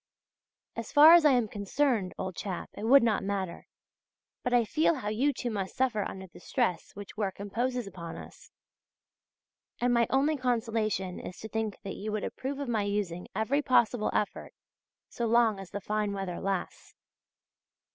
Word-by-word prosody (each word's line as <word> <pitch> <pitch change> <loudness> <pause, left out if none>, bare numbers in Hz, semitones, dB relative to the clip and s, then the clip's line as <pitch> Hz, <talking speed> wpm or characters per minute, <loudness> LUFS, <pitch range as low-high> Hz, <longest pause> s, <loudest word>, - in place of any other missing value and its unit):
As 230 -1 -6
far 305 +3 +9
as 340 -2 +7
I 290 - +7
am 245 -3 +2
concerned, 205 0 0
old 185 -2 -4
chap, 185 -1 -5
it 210 - -6
would 270 +3 +7
not 220 -4 +1
matter, 195 -3 -3 0.7
but 250 - -2
I 240 -2 +4
feel 310 +8 +2
how 220 -7 -4
you 250 +7 +2
too 245 -3 -4
must 195 -3 -4
suffer 250 -5 +1
under 190 0 -6
the 180 - -15
stress 185 - -1
which 205 +1 -10
work 195 -3 -2
imposes 240 +4 -2
upon 170 -4 -8
us; - - -12 1.3
and 245 0 +2
my 235 -1 +3
only 285 +3 +2
consolation 225 -7 -1
is 180 - -8
to 220 - -7
think 220 -1 -2
that 195 - -6
you 215 +2 -4
would 215 0 -2
approve 270 +2 -4
of 285 -1 -4
my 225 -3 0
using 200 -4 -2
every 255 +7 +1
possible 245 -4 +2
effort, 210 - -2 0.5
so 235 - -3
long 225 -3 +3
as 195 -2 -9
the 205 - -5
fine 210 0 -1
weather 195 -3 -4
lasts. 195 -2 -4
215 Hz, 175 wpm, -29 LUFS, 195-245 Hz, 1.3 s, far